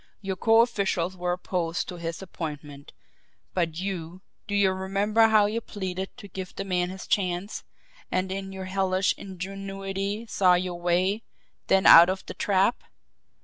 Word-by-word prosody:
Your 195 -2 -3
co 225 +4 +5
officials 190 -6 0
were 180 -1 -2
opposed 175 -1 -2
to 180 - -6
his 165 +2 -5
appointment, 150 -5 -7 0.6
but 165 -3 -1
you, 180 -1 -5 0.3
do 205 - -2
you 200 -2 +4
remember 200 +4 +2
how 215 -2 +5
you 220 +3 -1
pleaded 190 -3 -5
to 215 -5 -10
give 190 -1 -7
the 195 - -4
man 180 -2 0
his 190 0 -8
chance 185 +1 -1 0.5
and 185 0 -1
in 195 0 -4
your 190 -1 -6
hellish 190 0 +1
ingenuity 195 +2 -5
saw 185 -5 +4
your 180 -1 -2
way 185 +5 +1 0.5
then 195 0 +3
out 170 +2 +10
of 190 0 -3
the - - -7
trap! 200 +1 +1
190 Hz, 155 wpm, -26 LUFS, 180-195 Hz, 0.6 s, out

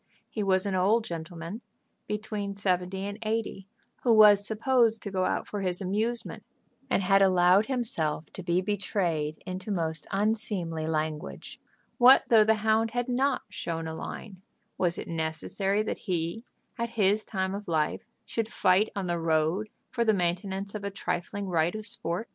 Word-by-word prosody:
He 215 - -3
was 190 -1 +3
an 200 - -1
old 200 +5 +3
gentleman, 170 +4 -6 0.5
between 210 -1 -4
seventy 190 -1 -1
and 205 +1 -6
eighty, 215 -3 -3 0.3
who 245 - +2
was 210 -2 +7
supposed 230 0 +2
to 200 - -5
go 185 -1 0
out - - -1
for 205 - -4
his 180 -2 0
amusement, 215 +5 -2 0.5
and 195 - +1
had 195 +1 +4
allowed 185 +2 +5
himself 165 - 0
to - - -7
be 175 0 +1
betrayed 180 -6 -2
into 185 +2 -6
most 165 -5 -2
unseemly 195 -7 -1
language. 155 -1 -4 0.4
What 255 +2 +8
though 225 -2 +7
the 220 +1 +3
hound 220 +1 +3
had 245 +1 -2
not 265 +2 +1
"shown 165 -1 -4
a 160 - -4
line?" 185 +3 -8 0.3
Was 175 -2 0
it - - -6
necessary 170 +5 -1
that - - -4
he, 175 +2 -3 0.4
at 235 0 -1
his 205 +1 +3
time 190 -2 -2
of 205 +1 -6
life, 160 -3 0 0.2
should 225 -2 -2
fight 195 -1 +3
on 200 -2 -2
the 175 -1 -1
road 165 +5 +1 0.2
for 235 - 0
the 220 -2 +3
maintenance 190 +2 -2
of 210 -2 -5
a 200 - -2
trifling 195 +1 -4
right 170 +1 +1
of 215 -1 -5
sport. 210 -3 -3
195 Hz, 165 wpm, -28 LUFS, 175-215 Hz, 0.5 s, What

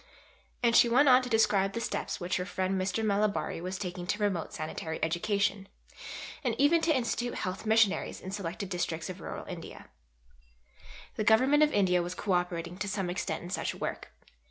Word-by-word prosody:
And 235 -1 +4
she 235 - +7
went 255 +5 +5
on 255 -1 +7
to 250 - -5
describe 200 -4 +3
the 230 - -2
steps 230 - -3
which 180 +1 -1
her 180 - -2
friend 190 -1 -1
Mr. 195 +4 -1
Malabari 205 -4 0
was 185 +2 -4
taking 180 -2 -5
to 205 - 0
promote 200 -6 -1
sanitary 160 +1 -5
education, 195 +4 0 0.8
and - - 0
even 325 +4 +4
to 330 - +2
institute 245 0 -2
Health 185 +4 -4
Missionaries, 220 -2 +2
in 185 - -7
selected 195 0 -4
districts 175 -1 -2
of 185 0 -10
Rural - - -6
India. - - -9 1.3
The 215 - 0
Government 260 +7 +5
of 300 0 +5
India 180 -5 +3
was 175 +1 -4
co 205 +1 -3
operating 175 0 -1
to 205 - -2
some 195 -3 -2
extent 180 - -3
in 175 - -8
such - - -2
work. - - -5
195 Hz, 180 wpm, -30 LUFS, 180-220 Hz, 1.3 s, she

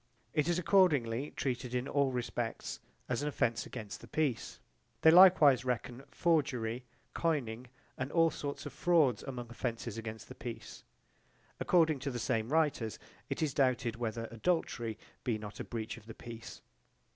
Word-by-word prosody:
It 150 0 +2
is 175 - +2
accordingly 150 - +3
treated 125 -2 -2
in 125 +2 -1
all 140 -2 +2
respects 120 -2 -3 0.3
as 125 +1 -1
an 145 - -1
offence 120 -5 0
against 105 -2 -7
the - - -11
peace. 150 -7 -1 0.4
They 160 - +8
likewise 170 -8 +8
reckon 125 +1 -3
forgery, 125 -7 0 0.3
coining, 130 -7 -1 0.3
and 130 +2 -2
all 165 -1 +4
sorts 145 +1 -5
of 145 - -6
frauds 150 -7 +3
among 120 -3 -6
offences 115 -2 -4
against 110 -1 -7
the - - -9
peace. - - -8 0.8
According 160 -5 +3
to 140 +2 -3
the 125 - -4
same 115 -1 -1
writers 145 -8 +1 0.3
it - - -1
is 145 -4 0
doubted 130 -4 +1
whether 115 -1 -3
adultery 115 - -1 0.3
be 115 -3 0
not 105 -1 -8
a - - -2
breach 115 -2 -5
of 110 -1 -15
the 115 - -9
peace. 115 -1 -9
125 Hz, 155 wpm, -33 LUFS, 115-150 Hz, 0.8 s, They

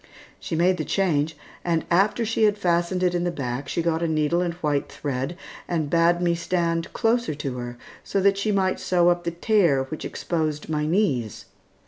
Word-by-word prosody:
She 165 - -4
made 180 +3 +3
the 155 - -2
change, 160 -5 0 0.3
and 165 -2 0
after 200 +6 +3
she 220 0 +2
had 210 -1 +2
fastened 175 -1 +1
it 180 -1 +2
in 175 0 0
the 175 - +1
back 135 -4 -4
she 170 - -1
got 165 -1 0
a 170 - +1
needle 155 +2 +1
and 175 -2 -2
white 150 -5 -1
thread 135 +4 -3 0.3
and 160 -4 -1
bade 170 +1 +3
me 170 -1 +3
stand 170 -1 -1
closer 230 -8 +1
to 135 -3 -4
her 120 0 -6 0.3
so 195 - -1
that 195 0 +3
she 210 +1 0
might 190 -2 +1
sew 175 -1 +3
up 175 0 0
the - - +1
tear 170 -5 +2
which 150 +4 -7
exposed 155 -3 -3
my 150 -1 0
knees. 150 - 0
170 Hz, 195 wpm, -24 LUFS, 150-180 Hz, 0.3 s, made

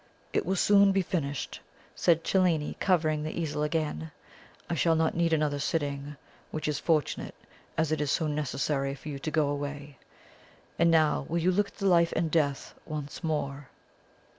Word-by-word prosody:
"It - - 0
will 190 - +1
soon 200 +1 +5
be 195 -1 +2
finished," 145 -7 -3 0.4
said 165 -1 +3
Cellini, 175 -6 +1
covering 155 -5 +2
the 155 +2 -4
easel 150 -2 -2
again; 155 +1 -1 0.6
"I - - -2
shall 165 0 +3
not 160 0 +2
need 170 0 +1
another 150 -2 +1
sitting, 145 -1 -2 0.3
which 155 - -4
is 150 -2 -1
fortunate, 155 -4 0 0.4
as 160 -1 +1
it 155 -1 0
is 145 - -1
so 160 - +1
necessary 140 -2 -1
for 150 - -9
you 140 -2 -5
to 155 - -3
go 155 -2 +2
away. 145 -1 -5 0.8
And 170 0 +5
now 160 -2 +3
will 170 - 0
you 175 +2 +2
look 200 +2 +2
at - - -19
the 200 - -3
'Life 170 -3 +4
and 165 -1 0
Death' 145 -4 0
once 150 +1 -6
more?" 145 -3 -2
155 Hz, 175 wpm, -29 LUFS, 145-170 Hz, 0.8 s, soon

